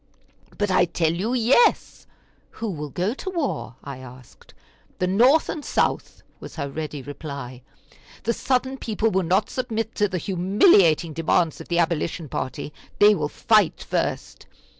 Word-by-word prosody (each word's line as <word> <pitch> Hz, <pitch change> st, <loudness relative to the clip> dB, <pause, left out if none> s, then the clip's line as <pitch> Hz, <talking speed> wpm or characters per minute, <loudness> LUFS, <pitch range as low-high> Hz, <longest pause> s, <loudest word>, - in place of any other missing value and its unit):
"But 205 Hz, -2 st, 0 dB
I 180 Hz, -1 st, +4 dB
tell 165 Hz, -1 st, 0 dB
you 210 Hz, +9 st, -1 dB
yes." 255 Hz, -, +2 dB, 0.5 s
"Who 225 Hz, -2 st, -3 dB
will 150 Hz, -3 st, -6 dB
go 180 Hz, -, -1 dB
to 375 Hz, -, -6 dB
war?" 320 Hz, -, -3 dB
I 140 Hz, -2 st, -7 dB
asked. 130 Hz, -1 st, -15 dB, 0.4 s
"The 180 Hz, -, 0 dB
North 245 Hz, +12 st, +4 dB
and 305 Hz, -, -5 dB
South," -, -, -1 dB, 0.2 s
was -, -, -10 dB
her 140 Hz, -4 st, -3 dB
ready 150 Hz, -2 st, -5 dB
reply. 140 Hz, -3 st, -8 dB, 0.6 s
"The 235 Hz, -, 0 dB
Southern 260 Hz, +2 st, -1 dB
people 220 Hz, 0 st, -1 dB
will 190 Hz, -, +2 dB
not 185 Hz, +4 st, +1 dB
submit 225 Hz, -3 st, -3 dB
to 205 Hz, -, +1 dB
the 185 Hz, -, -2 dB
humiliating 180 Hz, -, +3 dB
demands 165 Hz, 0 st, 0 dB
of -, -, -11 dB
the 170 Hz, -, -1 dB
Abolition 165 Hz, -1 st, -1 dB
party; 135 Hz, +4 st, -5 dB, 0.2 s
they 210 Hz, +1 st, +7 dB
will 150 Hz, -6 st, -2 dB
fight 210 Hz, -3 st, +2 dB
first." -, -, -3 dB
180 Hz, 155 wpm, -23 LUFS, 155-225 Hz, 0.6 s, they